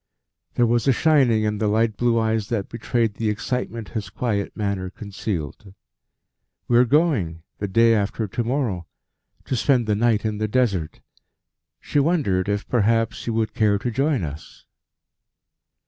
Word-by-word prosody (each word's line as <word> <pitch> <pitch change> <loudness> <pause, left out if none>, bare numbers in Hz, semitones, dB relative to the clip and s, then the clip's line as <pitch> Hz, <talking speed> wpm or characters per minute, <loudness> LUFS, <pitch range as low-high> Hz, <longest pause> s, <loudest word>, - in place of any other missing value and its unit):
There 120 - +4
was 120 +2 +1
a - - +6
shining 130 -7 +3
in 105 -1 -1
the 110 - +1
light 110 +1 +1
blue 120 +1 +1
eyes 110 -2 0
that 105 -5 -2
betrayed 115 -1 -1
the 110 -1 0
excitement 115 0 -3
his 105 -5 -5
quiet 100 -1 -2
manner 100 -3 -2
concealed. 95 -2 -6 0.9
"We 120 0 +4
are 125 - +6
going 125 - +1 0.2
the 100 - -2
day 115 +4 +4
after 105 +1 -1
to 120 +5 -2
morrow 115 - -2 0.6
to - - -1
spend 125 0 +2
the 105 - +1
night 110 0 +1
in 105 -1 -2
the 110 - 0
Desert; 100 -9 0 0.8
she 145 - -1
wondered 135 - +1
if, 100 0 -2
perhaps, 115 -1 +1
you 115 - -1
would 110 -1 0
care 105 -4 +2
to 120 +4 -3
join 135 - 0
us?" 75 0 -8
110 Hz, 160 wpm, -23 LUFS, 100-120 Hz, 0.9 s, a